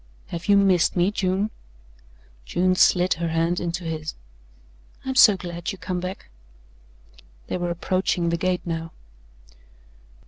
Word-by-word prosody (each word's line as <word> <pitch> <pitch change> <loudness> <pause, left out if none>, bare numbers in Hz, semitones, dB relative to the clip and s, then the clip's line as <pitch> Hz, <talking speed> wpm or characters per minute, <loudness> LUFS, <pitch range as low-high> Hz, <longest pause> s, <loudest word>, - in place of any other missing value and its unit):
"Have 170 +1 -6
you 200 - +6
missed 190 -4 +3
me, 180 +2 +2
June?" 195 +1 -1 0.9
June 185 - +1
slid 180 0 +4
her 170 0 -3
hand 165 +2 0
into 175 +1 -3
his. 160 -2 -4 0.9
"I'm 265 - -2
so 215 -6 +7
glad 175 0 -5
you 195 - -8
come 180 0 -3
back." 185 - -7 1.1
They - - -3
were 175 -1 -2
approaching 175 0 0
the 170 - +1
gate 180 +1 -1
now. 165 -1 -4
180 Hz, 135 wpm, -24 LUFS, 170-185 Hz, 1.1 s, so